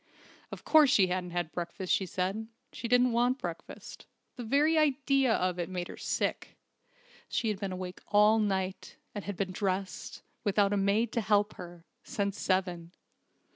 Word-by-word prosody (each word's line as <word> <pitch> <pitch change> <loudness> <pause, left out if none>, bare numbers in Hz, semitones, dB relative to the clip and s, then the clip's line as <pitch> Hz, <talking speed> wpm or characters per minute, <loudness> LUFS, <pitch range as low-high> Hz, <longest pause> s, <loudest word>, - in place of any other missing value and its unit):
Of - - -9
course 310 -3 +6
she 190 -6 +4
hadn't 180 -1 -3
had 175 -2 -3
breakfast, 175 +2 -3
she 190 - +1
said. 190 +5 -2 0.3
She 235 - -5
didn't 245 +1 +4
want 245 +2 +2
breakfast. 175 -9 -8 0.3
The 245 - -6
very 290 +7 +3
idea 275 -4 +2
of 180 -4 0
it 175 - -2
made 180 -1 -4
her - - -7
sick. - - -3 0.7
She 225 - 0
had 205 -3 -2
been 195 -2 -3
awake 185 0 -6
all 210 +2 +5
night, 190 -2 -2 0.2
and 205 - -6
had 205 -3 -5
been 190 -1 -2
dressed 190 0 -3 0.2
without 205 0 +2
a - - +2
maid 200 +4 +1
to 235 - 0
help 205 0 +2
her 175 -1 -10 0.2
since 200 0 -3
seven. 180 -2 -1
200 Hz, 170 wpm, -30 LUFS, 185-225 Hz, 0.7 s, course